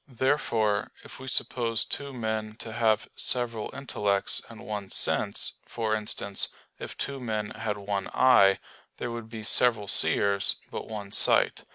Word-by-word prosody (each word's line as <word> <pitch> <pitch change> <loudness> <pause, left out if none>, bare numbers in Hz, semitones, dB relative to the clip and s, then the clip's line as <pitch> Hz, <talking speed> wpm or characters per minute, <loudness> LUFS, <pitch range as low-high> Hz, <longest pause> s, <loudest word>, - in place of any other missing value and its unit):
Therefore, 115 -6 0
if - - -12
we 130 - -9
suppose 115 -3 +1
two 140 -1 -2
men 110 -3 -3
to 110 -1 -7
have 110 -2 +1
several 115 -3 -1
intellects 105 -7 -1
and - - -12
one 105 -2 -5
sense - - +1
for 110 -2 -2
instance, 105 -2 0 0.3
if - - -7
two 140 -1 -4
men 110 -4 -3
had 105 -1 -4
one 100 -1 -3
eye 100 -7 +5 0.4
there 120 - -4
would 115 -1 -7
be 110 -1 -8
several 110 -1 +4
seers, 100 0 +4 0.2
but - - -6
one 105 -3 -7
sight. - - +2
110 Hz, 150 wpm, -27 LUFS, 105-120 Hz, 0.4 s, eye